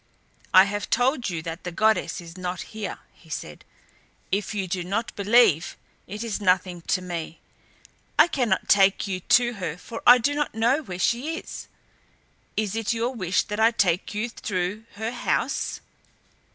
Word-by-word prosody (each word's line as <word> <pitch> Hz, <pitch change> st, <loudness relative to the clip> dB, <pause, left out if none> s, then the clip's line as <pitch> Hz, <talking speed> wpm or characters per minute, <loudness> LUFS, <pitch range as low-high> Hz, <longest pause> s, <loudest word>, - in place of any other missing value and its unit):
"I 185 Hz, -, +9 dB
have 205 Hz, +1 st, -3 dB
told 245 Hz, -1 st, +1 dB
you 165 Hz, -3 st, -4 dB
that 165 Hz, +1 st, -6 dB
the 180 Hz, -, -4 dB
goddess 215 Hz, +1 st, +1 dB
is 165 Hz, 0 st, -11 dB
not 180 Hz, -1 st, -4 dB
here," 215 Hz, -2 st, -5 dB, 0.2 s
he 160 Hz, -, -21 dB
said. 75 Hz, -, -6 dB, 0.7 s
"If 200 Hz, +2 st, -1 dB
you 195 Hz, -2 st, -2 dB
do 180 Hz, 0 st, -2 dB
not 210 Hz, +6 st, -3 dB
believe 200 Hz, -6 st, +3 dB, 0.3 s
it 210 Hz, +4 st, -5 dB
is 220 Hz, -2 st, -3 dB
nothing 180 Hz, -2 st, +1 dB
to 185 Hz, -, +1 dB
me. 170 Hz, -2 st, -5 dB, 0.8 s
I -, -, +7 dB
cannot 245 Hz, -, 0 dB
take 195 Hz, 0 st, +4 dB
you 190 Hz, -2 st, -3 dB
to 240 Hz, +6 st, +3 dB
her 165 Hz, -2 st, -3 dB
for 225 Hz, +5 st, -8 dB
I 245 Hz, -, +10 dB
do 250 Hz, +4 st, 0 dB
not 290 Hz, -5 st, -2 dB
know 240 Hz, +7 st, +2 dB
where 185 Hz, -, -7 dB
she 250 Hz, -, 0 dB
is. -, -, -8 dB, 0.9 s
Is 215 Hz, -1 st, -1 dB
it 225 Hz, +1 st, 0 dB
your 235 Hz, +3 st, -1 dB
wish 185 Hz, -6 st, 0 dB
that 210 Hz, 0 st, -5 dB
I 225 Hz, +1 st, +6 dB
take 195 Hz, -4 st, 0 dB
you 215 Hz, +3 st, -1 dB
through 200 Hz, 0 st, -3 dB
her 220 Hz, +2 st, -3 dB
house?" 245 Hz, -, -1 dB
205 Hz, 170 wpm, -25 LUFS, 180-230 Hz, 0.9 s, I